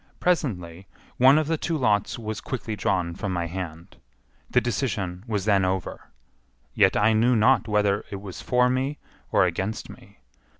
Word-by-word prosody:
Presently 95 - -1 0.3
one 135 +3 +6
of 155 - +2
the 160 +1 -1
two 165 -2 -1
lots 105 -7 +1
was 110 -2 -5
quickly 110 -4 -4
drawn 90 -3 -1
from 100 +2 -4
my 85 -2 -1
hand. 85 0 -7 0.5
The - - +4
decision 105 -7 -2
was 105 -4 -2
then 100 -3 +3
over, 95 -1 -3 0.6
yet - - +3
I 105 +2 +4
knew 120 +3 +3
not 115 +4 +3
whether 105 -1 +1
it 100 - -6
was 95 -2 -8
for 125 0 +2
me 130 +3 -1 0.3
or - - +4
against 100 +4 -3
me. - - -16
105 Hz, 165 wpm, -25 LUFS, 95-125 Hz, 0.6 s, one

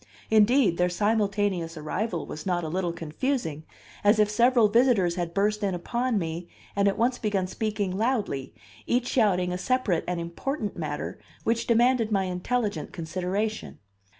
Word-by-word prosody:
Indeed, 215 -3 +4
their 180 0 +2
simultaneous 200 -4 0
arrival 170 +3 -2
was 155 - -7
not 175 -2 0
a 160 - -3
little 175 +1 -1
confusing, 165 - -3 0.4
as 205 +2 +5
if 210 -1 +3
several 235 +1 +4
visitors 225 -6 +3
had 175 -1 -3
burst 210 +3 +1
in 195 -3 0
upon 240 +6 -1
me 170 -1 -3 0.3
and 200 0 +3
at 195 - +1
once 245 +2 +1
begun 205 -4 0
speaking 205 -1 -2
loudly, 210 - -1 0.4
each 245 0 +1
shouting 185 -8 +2
a 180 - -3
separate 215 -5 +1
and 180 -1 -1
important 205 - -3
matter 150 -3 -4 0.2
which 230 +1 0
demanded 235 -1 +3
my 195 -2 +2
intelligent 205 +4 -2
consideration. 185 +6 -3
200 Hz, 150 wpm, -26 LUFS, 175-230 Hz, 0.4 s, as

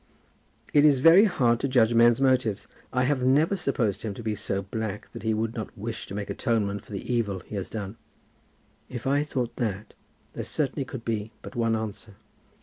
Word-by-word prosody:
"It 145 - +6
is 145 -3 +6
very 165 +10 +7
hard 120 - +2
to - - 0
judge 120 -4 +4
of 115 - +2
men's 120 0 +6
motives. 130 -6 +1 0.2
I 125 0 +1
have 135 0 +1
never 145 +9 +3
supposed 130 - -1
him 105 -3 -4
to 120 - -8
be 110 -1 -1
so 100 -1 -3
black 105 +1 -5
that - - -8
he 110 +1 0
would 110 +1 -1
not 110 -3 -6
wish 110 +2 -5
to 100 - -7
make 100 -1 -4
atonement 100 -3 -1
for - - -17
the 100 +4 -4
evil 100 -6 -1
he - - -13
has 100 -2 -4
done." 105 0 -6 0.9
"If 120 -1 -6
I 140 +2 +2
thought 125 -5 -3
that 105 -4 -3 0.4
there - - -4
certainly 140 -2 -2
could 130 -3 -8
be 110 -2 -2
but - - -9
one 115 -1 +1
answer." 110 -1 -6
115 Hz, 205 wpm, -26 LUFS, 105-130 Hz, 0.9 s, very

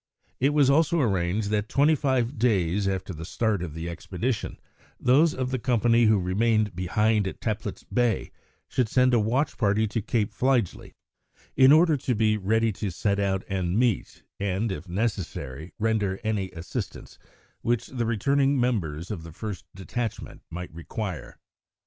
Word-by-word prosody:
It 135 - +3
was 145 -3 +5
also 160 +4 +3
arranged 100 - 0
that 105 0 0
twenty 145 +3 +4
five 130 -4 0
days 100 -4 +2
after 95 -1 -2
the 80 0 -8
start 105 +2 -1
of 80 -4 -5
the 80 +1 -5
expedition, 95 +7 -3 0.4
those 150 +6 +4
of 130 0 -2
the 130 - -1
company 120 -1 +3
who 110 -1 +5
remained 105 +2 +1
behind 105 +3 +1
at - - -6
Teplitz 110 -1 -3
Bay 120 -2 0 0.4
should 125 -4 0
send 125 +1 +3
a 120 - +5
watch 125 +8 0
party 105 -1 +2
to 110 +1 -2
Cape 105 0 -1
Fligely, 125 -7 0 0.6
in 130 +1 +7
order 160 0 +5
to 125 -1 -1
be 110 0 +2
ready 110 +3 +1
to 105 0 -4
set 100 +3 -1
out 95 -1 0
and 95 -1 -1
meet, 120 -3 0 0.2
and, 100 +2 -1
if 90 0 -6
necessary, 90 - -3
render 105 -3 0
any 105 -4 -1
assistance 85 -1 -7 0.4
which 120 -1 0
the 120 -3 -3
returning 135 +5 +2
members 90 -9 -1
of 100 -6 -4
the 80 0 -10
first 95 0 -6
detachment 110 +4 -5
might 90 0 -7
require. 90 +2 -6
110 Hz, 160 wpm, -26 LUFS, 95-120 Hz, 0.6 s, in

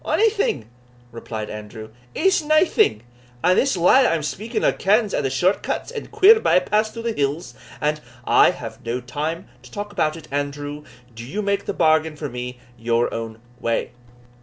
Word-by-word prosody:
"Onything," 405 - +1 0.4
replied 110 -2 -6
Andrew, 105 +1 -8 0.3
"is 380 -2 +3
naething; 310 - +3 0.4
and 180 - +4
this 270 -7 +1
lad 250 +10 +5
that - - +3
I - - +2
am 155 - -3
speaking 215 - -3
o' - - +4
kens 210 +2 +2
a' - - +1
the 135 - -1
short 175 +10 +1
cuts - - -3
and 455 -3 -7
queer 440 +4 +6
by - - +3
paths 210 +4 +1
through 230 +1 -8
the 230 - 0
hills, 145 0 -2 0.3
and" 150 +1 -1 0.2
"I - - +6
have - - -7
no 115 +2 -2
time 150 +7 -4
to - - -15
talk 205 0 -6
about 155 -6 0
it, 155 -2 -12
Andrew; 145 +1 -4 0.3
do 115 +1 -9
you 200 - -4
make 200 0 -1
the 200 - -2
bargain 155 0 +2
for 150 -1 -5
me 125 0 -6 0.2
your 115 +1 0
own 115 -1 -6 0.2
way." 115 0 -1
155 Hz, 185 wpm, -22 LUFS, -, 0.4 s, queer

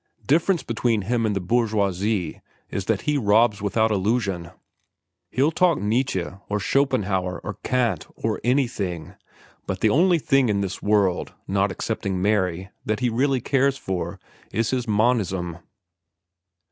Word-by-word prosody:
Difference 170 +4 +2
between 115 -2 0
him 115 +2 0
and 105 - -1
the - - 0
bourgeoisie 100 -2 0 0.3
is 100 - -3
that 110 -2 0
he 150 -1 0
robs 110 -1 +3
without 110 +2 +1
illusion. 100 -4 0 0.8
He'll 140 +5 +2
talk 175 0 +3
Nietzsche, 105 -3 0 0.2
or 105 0 0
Schopenhauer, 100 -8 0
or - - -6
Kant, 125 -3 0
or 110 -1 -2
anything, 115 - -1 0.5
but - - -3
the - - +4
only 175 +4 +4
thing 135 -5 +2
in 100 -1 +1
this 95 -2 -4
world, 100 -3 +1
not 100 +1 +1
excepting 95 -1 -3
Mary, 95 -2 0
that 110 +3 -2
he 125 - +2
really 130 +2 +1
cares 135 +2 +2
for, 95 -8 -4 0.3
is 115 +2 0
his 125 -2 -1
monism. 100 -6 +1
110 Hz, 140 wpm, -24 LUFS, 95-125 Hz, 0.8 s, the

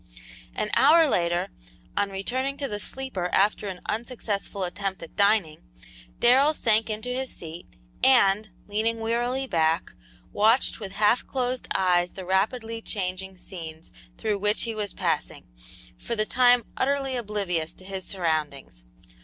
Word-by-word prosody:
An 210 - -2
hour 315 +4 +6
later, 175 -5 +1 0.5
on 205 - +1
returning 260 +8 -2
to 280 - -2
the 205 -4 -4
sleeper 210 -6 -4
after 205 +1 +2
an 185 -2 -6
unsuccessful 215 -4 -3
attempt 190 0 -3
at 165 - -11
dining, 200 -6 +2 0.6
Darrell 270 +6 +5
sank 225 -3 +2
into 215 +3 -3
his 260 +1 -2
seat, 165 +1 -9 0.4
and, 215 -5 +5 0.2
leaning 220 +2 -1
wearily 240 +4 0
back, 165 -7 +1 0.4
watched 225 +5 +3
with 200 -3 -6
half 210 +3 +3
closed 255 -1 -2
eyes 180 -2 +2
the 190 - -8
rapidly 225 +5 0
changing 190 -2 -4
scenes 165 -3 -8 0.3
through 215 -2 -1
which 210 +1 +1
he 230 - -2
was 210 -3 -3
passing, - - -2 0.5
for - - -3
the 215 -1 0
time 245 0 +4
utterly 270 -1 0
oblivious 195 -8 -2
to 185 - -15
his 190 -1 -5
surroundings. 155 - -2
210 Hz, 140 wpm, -26 LUFS, 185-240 Hz, 0.6 s, hour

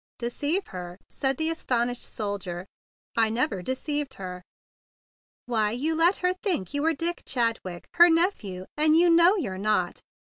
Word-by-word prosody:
"Deceive 290 +10 -1
her?" 180 -1 -7
said 270 -2 0
the 320 +1 +1
astonished 245 -6 -1
soldier. 195 -4 -4 0.5
"I 225 -1 +3
never 230 - -1
deceived 275 - -2
her." 180 -4 -7 1.0
"Why, 220 -3 +1
you 270 +9 -1
let 335 +4 +3
her 360 - +3
think 370 - -2
you 285 - 0
were 325 +2 +2
Dick 340 +4 -2
Chadwick, 230 -8 -2
her 345 +1 +9
nephew; 325 - 0
and 310 +1 +4
you 345 0 +5
know 340 +4 +6
you're 200 - -3
not! 200 -4 0
255 Hz, 155 wpm, -26 LUFS, 200-325 Hz, 1.0 s, her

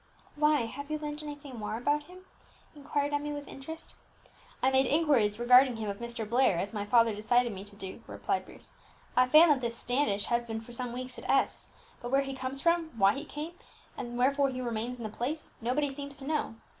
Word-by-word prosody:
"Why, 300 -1 +3
have 255 +6 -6
you 305 - -1
learned 300 0 -5
anything 290 -4 -8
more 215 +1 -3
about 290 +5 0
him?" 365 +2 -14 0.5
inquired 290 0 -2
Emmie 295 0 -1
with 290 0 -6
interest. 320 +5 -9 0.7
"I 265 - +4
made 265 0 +4
inquiries 270 -9 +3
regarding 250 +1 +6
him 215 -2 -3
of 200 - -8
Mr. 235 -2 -5
Blair, 235 -5 +3
as 195 +4 -2
my 205 -2 -2
father 230 0 +5
desired 235 +3 +2
me 195 -1 -7
to 205 0 -15
do," 195 +2 -7
replied - - -2
Bruce. - - -14 0.4
"I 250 0 +5
find 310 +4 +8
that 275 -3 +2
this 235 -1 -2
Standish 245 -6 0
has 240 0 +1
been 225 -1 -4
for 225 - -12
some 245 0 -4
weeks 255 +1 -6
at - - -9
S; 270 - +1 0.3
but 240 - -5
where 275 +2 +3
he 270 0 -5
comes 265 +1 -4
from, 335 -1 +2
why 195 -1 +5
he 280 - -5
came, 305 +3 -6 0.4
and 240 0 -5
wherefore 275 +2 +3
he 255 -1 -5
remains 240 0 -3
in 235 - -8
the 215 - -3
place, 280 +8 -4
nobody 270 +5 0
seems 280 0 -7
to 270 - -9
know. 300 -6 -1
255 Hz, 215 wpm, -30 LUFS, 235-290 Hz, 0.7 s, find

